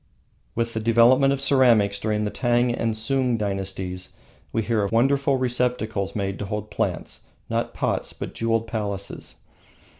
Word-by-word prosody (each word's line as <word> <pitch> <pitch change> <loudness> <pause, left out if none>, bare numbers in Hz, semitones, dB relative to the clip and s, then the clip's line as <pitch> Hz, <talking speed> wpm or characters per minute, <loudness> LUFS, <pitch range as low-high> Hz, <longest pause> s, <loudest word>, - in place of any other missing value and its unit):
With 115 0 -1
the 110 - -1
development 115 +4 +5
of 140 - 0
ceramics 120 -8 +4
during 105 0 0
the 105 - -2
Tang 120 -1 +1
and 115 -2 -1
Sung 125 +2 +1
dynasties 95 -3 -4 0.4
we 115 - 0
hear 115 -1 +1
of 100 - -2
wonderful 135 +3 +3
receptacles 125 -5 -1
made 100 -2 -2
to 105 - -3
hold 105 +1 -4
plants, - - -3 0.2
not - - -1
pots, - - -1
but - - -7
jewelled 115 0 0
palaces. 100 -3 -4
115 Hz, 150 wpm, -24 LUFS, 105-125 Hz, 0.4 s, development